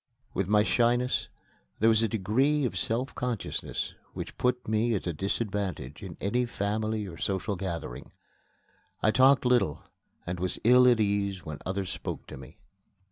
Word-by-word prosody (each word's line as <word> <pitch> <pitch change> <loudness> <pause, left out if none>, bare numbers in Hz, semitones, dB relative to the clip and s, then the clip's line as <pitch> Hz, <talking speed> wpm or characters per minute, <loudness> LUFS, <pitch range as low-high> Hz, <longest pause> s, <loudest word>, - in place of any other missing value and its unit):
With 95 - -1
my 105 +1 +4
shyness 120 +3 +2 0.5
there 110 - +3
was 110 -1 +5
a 115 - +3
degree 130 +8 +1
of 125 - -2
self 120 +3 0
consciousness 125 -3 -3 0.2
which - - -6
put 125 0 0
me 110 +2 +2
at 100 - -3
a 85 - -1
disadvantage 95 - -3
in 95 -4 -8
any 120 +5 0
family 110 0 -1
or 85 -4 -9
social 100 +1 -1
gathering. 90 -3 -5 0.9
I 110 - +5
talked 130 +3 +5
little 105 -11 +2 0.4
and 90 0 -4
was 90 0 -2
ill 125 +2 +7
at 120 -2 +5
ease 100 -3 0
when 75 -2 -6
others 95 -1 -2
spoke - - -5
to - - -7
me. 65 +5 -12
105 Hz, 160 wpm, -28 LUFS, 95-120 Hz, 0.9 s, ill